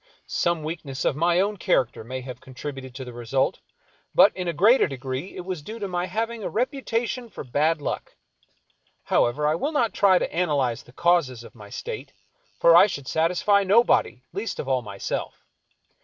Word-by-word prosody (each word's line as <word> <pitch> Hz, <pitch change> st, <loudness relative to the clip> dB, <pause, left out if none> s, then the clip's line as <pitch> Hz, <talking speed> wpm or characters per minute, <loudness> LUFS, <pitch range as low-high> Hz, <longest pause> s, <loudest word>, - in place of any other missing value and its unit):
Some 170 Hz, -2 st, 0 dB
weakness 155 Hz, -4 st, -5 dB
of -, -, +2 dB
my 170 Hz, +3 st, +2 dB
own 205 Hz, +2 st, +1 dB
character 120 Hz, -9 st, 0 dB
may 130 Hz, +3 st, -5 dB
have 125 Hz, -1 st, -9 dB
contributed 130 Hz, -1 st, -8 dB
to 130 Hz, -1 st, -6 dB
the 125 Hz, -, -9 dB
result, 120 Hz, +3 st, -1 dB, 0.6 s
but -, -, +6 dB
in 180 Hz, -1 st, -4 dB
a -, -, +1 dB
greater 205 Hz, -, +5 dB
degree 135 Hz, +4 st, -5 dB
it 180 Hz, -, -6 dB
was 185 Hz, -4 st, -4 dB
due 220 Hz, +10 st, -8 dB
to 205 Hz, -3 st, -4 dB
my 180 Hz, -1 st, -2 dB
having 225 Hz, +1 st, -3 dB
a -, -, -2 dB
reputation 245 Hz, -1 st, -2 dB
for -, -, -8 dB
bad 150 Hz, +4 st, 0 dB
luck. -, -, -4 dB, 0.9 s
However, 140 Hz, +5 st, +1 dB
I 150 Hz, -, +3 dB
will 280 Hz, -, -1 dB
not 235 Hz, -, +1 dB
try 195 Hz, -2 st, +5 dB
to -, -, -2 dB
analyze 145 Hz, -9 st, 0 dB
the -, -, -18 dB
causes 140 Hz, -6 st, +1 dB
of -, -, -13 dB
my 105 Hz, -4 st, -13 dB
state, 455 Hz, -, -6 dB, 0.5 s
for -, -, +6 dB
I -, -, +8 dB
should 140 Hz, -9 st, -6 dB
satisfy 180 Hz, +5 st, +2 dB
nobody, 195 Hz, -, +3 dB
least 205 Hz, +5 st, -4 dB
of -, -, -4 dB
all 130 Hz, -2 st, +1 dB
myself. 100 Hz, -4 st, -5 dB
165 Hz, 185 wpm, -25 LUFS, 130-200 Hz, 0.9 s, I